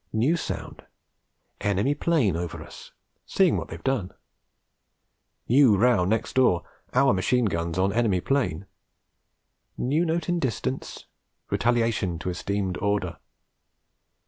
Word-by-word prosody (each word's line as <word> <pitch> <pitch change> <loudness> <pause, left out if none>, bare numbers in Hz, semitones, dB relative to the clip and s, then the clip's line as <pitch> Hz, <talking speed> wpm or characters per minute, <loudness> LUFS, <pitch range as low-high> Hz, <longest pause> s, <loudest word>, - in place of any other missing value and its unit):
New 125 +10 +2
sound: 170 - -6 0.8
enemy 105 +7 +1
'plane 145 - +1
over 85 0 -4
us, - - -13 0.4
seeing - - +3
what - - -3
they've - - -9
done. 130 -9 -1 1.4
New 125 -4 +5
row 115 -4 +3
next 110 +4 -1
door: 125 -10 +3 0.3
our 135 -1 +5
machine 120 +6 +1
guns 85 -3 -2
on 95 +1 +1
enemy 110 -5 +2
'plane! 100 - -1 1.1
New 145 +7 +1
note 165 -1 -1
in 175 -1 0
distance: 110 - -3 0.5
retaliation 115 -6 +1
to 90 +2 -3
esteemed 95 +1 -2
order.... 100 -6 -1
110 Hz, 120 wpm, -25 LUFS, 95-130 Hz, 1.4 s, New